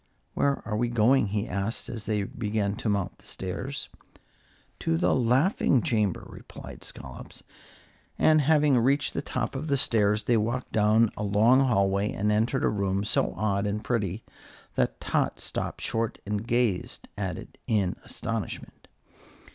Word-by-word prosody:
"Where 140 -1 +1
are 105 - -1
we 120 +3 +1
going?" 120 +1 +4
he 105 +1 -2
asked, 100 +4 -3
as 115 -4 -6
they 105 -1 0
began 105 0 -2
to 110 - -2
mount 100 -3 -1
the - - -7
stairs. 110 +10 -4 0.9
"To 80 - 0
the 90 +2 +2
laughing 130 - +3
chamber," 105 -5 0
replied - - -11
Scollops; 65 - -9 0.7
and 155 -1 +5
having 145 -3 +4
reached 135 +4 +2
the - - -2
top 125 -3 -3
of 140 +4 -4
the 140 -2 +2
stairs, 105 -4 +3
they 120 - +3
walked 120 +4 -2
down 110 +1 +4
a - - -6
long 105 +5 +4
hallway 100 -6 +2
and 105 +2 0
entered 115 +5 +1
a - - +4
room 100 -1 0
so 105 - 0
odd 100 0 0
and 105 +1 -2
pretty 105 -3 -1 0.5
that - - 0
Tot - - 0
stopped - - -4
short 115 0 -1
and 105 +2 -3
gazed 120 -6 0
at 95 -5 -3
it - - -12
in 100 -5 +1
astonishment. - - -5
110 Hz, 155 wpm, -27 LUFS, 100-125 Hz, 0.9 s, and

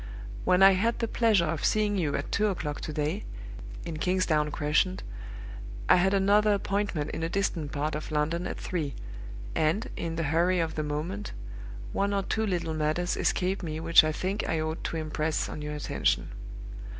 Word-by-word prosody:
When 185 +1 +5
I 195 - +10
had 225 +5 +1
the 230 - -1
pleasure 220 -7 +3
of 160 -1 -2
seeing 210 -1 +2
you 160 -7 0
at 140 - -3
two 210 +1 +2
o'clock 155 -7 -3
to - - -4
day, 155 +7 -2 0.6
in 165 -2 -4
Kingsdown 160 -3 +1
Crescent, 150 +5 0 0.8
I - - +7
had 190 +2 +3
another 205 +2 +4
appointment 200 -7 -1
in - - -4
a 165 - -1
distant 170 -6 -1
part 150 +1 -2
of 150 +1 -4
London 155 +4 0
at - - -5
three; 150 -8 -3 0.6
and, 165 +7 0
in 165 -1 -3
the 165 - -1
hurry 175 +2 +3
of 165 -1 -1
the 155 - -2
moment, 155 +8 -4 0.6
one 200 0 +1
or 195 - 0
two 220 +3 -1
little 175 -4 -1
matters 155 +3 0
escaped 190 +1 0
me 155 -3 -4
which 165 0 +6
I 155 - +1
think 190 +6 -2
I 165 - +1
ought 155 +1 -3
to 165 - -2
impress 155 0 -1
on 150 - -6
your 150 0 -4
attention. 150 - 0
170 Hz, 185 wpm, -28 LUFS, 155-195 Hz, 0.8 s, I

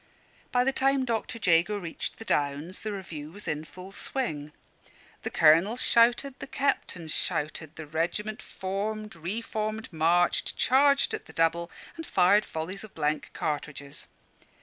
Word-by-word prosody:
By 245 0 +4
the 270 +1 +1
time 270 0 +2
Dr. 230 0 -2
Jago 180 0 +3
reached 170 -5 -4
the 225 - -9
Downs, 145 +2 -1
the 215 - -3
review 160 -7 -6
was 205 +4 -9
in 150 0 -1
full 185 +4 -11
swing. 155 - -3 0.7
The - - -3
colonel 165 +9 +5
shouted, 245 +3 +4
the - - -6
captains 220 - -1
shouted, 155 +1 -2
the 160 - -7
regiment 175 +8 -2
formed, 210 +3 -4
re 175 +8 -3
formed, 215 -2 -3
marched, 170 +3 +2
charged 280 +2 +4
at - - -5
the - - -13
double, 170 +1 +1 0.3
and 325 - -5
fired 195 +3 +4
volleys 165 +6 -5
of 215 - -12
blank 150 -1 -1
cartridges. 145 -2 -4
185 Hz, 150 wpm, -28 LUFS, 160-220 Hz, 0.7 s, colonel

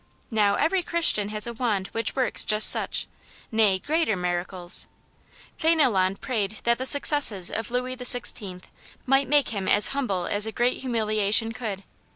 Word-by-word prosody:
Now, 205 -2 +2
every 360 - 0
Christian 330 -12 +2
has 210 0 -3
a 235 - -6
wand 220 -5 -2
which 225 0 -3
works 260 -3 +3
just 215 0 +3
such, - - -1 0.5
nay, 215 -4 +2
greater, 300 - -1
miracles. 180 0 -2 0.7
Fdndlon 240 - +1
prayed 215 -5 -3
that 235 0 +1
the 260 - -4
successes 280 - +2
of 225 -1 -5
Louis 250 +1 -3
XIV. 230 -7 -1 0.4
might 270 +1 +1
make 290 -2 +2
him 200 -4 -4
as 205 - +4
humble 235 -11 -3
as 205 +4 -1
a - - -4
great 240 +3 -1
humiliation 220 -3 +1
could. 215 -4 -6
220 Hz, 155 wpm, -24 LUFS, 200-255 Hz, 0.7 s, as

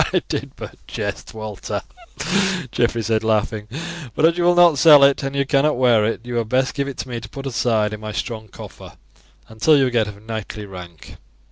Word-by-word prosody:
"I - - +2
did - - -4
but - - -9
jest, - - -5
Walter," 105 -1 -5 0.9
Geoffrey 115 +1 0
said 110 +1 0
laughing; 110 -1 0 0.5
"but 155 - +3
as 165 +1 +4
you 175 0 0
will 175 0 +4
not 170 -5 +5
sell 150 -3 +8
it, 140 0 +4
and 135 0 -4
you 140 0 +1
cannot 140 +1 +2
wear 120 -4 +4
it, 115 - -2
you 120 0 -4
had 115 -2 -2
best 130 +2 +1
give 140 0 -2
it 140 - -5
me 120 -2 -5
to 110 -2 -11
put 135 +2 -8
aside 115 -4 0
in 105 - -6
my 110 0 -6
strong 110 0 -5
coffer - - -12 0.5
until 110 +8 +3
you 135 -2 +3
get 115 -3 +1
of 105 -1 -9
knightly 110 -1 -6
rank." 90 -4 -11
115 Hz, 205 wpm, -21 LUFS, 110-140 Hz, 0.9 s, sell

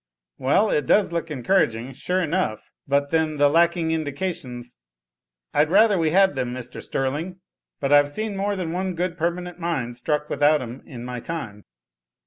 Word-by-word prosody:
"Well, 170 +11 +3
it 150 -4 0
does 205 -4 +4
look 170 -1 -3
encouraging, 130 -4 0
sure 180 +8 -1
enough 160 - -1 0.2
but 140 0 +1
then 160 -2 +1
the 145 0 +5
lacking 165 +2 +2
indications 145 -5 -4 0.4
" - - -58
"I'd 150 +1 +3
rather 210 +3 +5
we 165 -3 +2
had 190 +3 +4
them, 125 -2 -3
Mr. 125 0 -7
Sterling, 150 +8 -3 0.4
but 140 0 +1
I've 145 0 +6
seen 215 +6 -3
more 200 +1 -1
than 175 -4 -3
one 185 0 -2
good 175 0 -2
permanent 175 +1 -3
mine 155 -9 -2
struck 150 +5 -1
without 150 +1 +3
'em 125 0 -7
in 120 -4 -8
my 125 0 -5
time." 115 -9 -6
155 Hz, 170 wpm, -23 LUFS, 130-180 Hz, 0.4 s, I've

